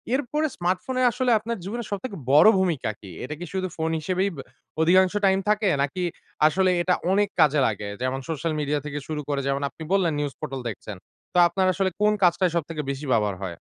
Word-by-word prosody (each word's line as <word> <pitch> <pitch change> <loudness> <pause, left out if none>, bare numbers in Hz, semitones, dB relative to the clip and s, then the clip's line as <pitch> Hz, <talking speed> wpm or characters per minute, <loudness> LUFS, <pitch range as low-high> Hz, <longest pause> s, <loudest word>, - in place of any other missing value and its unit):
এরপরে 295 +3 -1
স্মার্টফোনে 185 +9 -1
আসলে 250 0 0
আপনার 230 +1 -4
জীবনের 230 +4 -5
সবথেকে 200 +1 -4 0.2
বড় 150 +8 +7
ভূমিকা 170 -11 0
কি? 95 -3 -10
এটা 150 - -5
কি 175 - -5
শুধু 185 -1 -1
ফোন 160 0 -1
হিসেবেই 185 +5 0
বে 135 - -6 0.4
অধিকাংশ 185 +3 +4
টাইম 190 0 +4
থাকে 210 -1 +2 0.2
নাকি 180 +6 -3 0.4
আসলে 185 +4 +2
এটা 180 +1 +2 0.2
অনেক 205 +1 +2
কাজে 150 -1 +4
লাগে। 105 -1 -3
যেমন 130 +1 -1
সোশ্যাল 160 +1 -2
মিডিয়া 150 0 0
থেকে 145 0 -4
শুরু 155 -1 -3
করে 140 -1 0
যেমন 140 +1 0
আপনি 160 - -10
বললেন 175 -5 +2
নিউজ 145 -2 -2
পোর্টাল 135 -4 -5
দেখছেন। 105 -1 -8 0.4
তা 180 - +3
আপনার 185 +2 +1
আসলে 190 +1 0
কোন 210 0 +4
কাজটায় 175 0 +3
সবথেকে 160 -1 -2
বেশি 140 +2 -6
ব্যবহার 105 -4 +2
হয়? 95 - -2
170 Hz, 200 wpm, -24 LUFS, 145-195 Hz, 0.4 s, বড়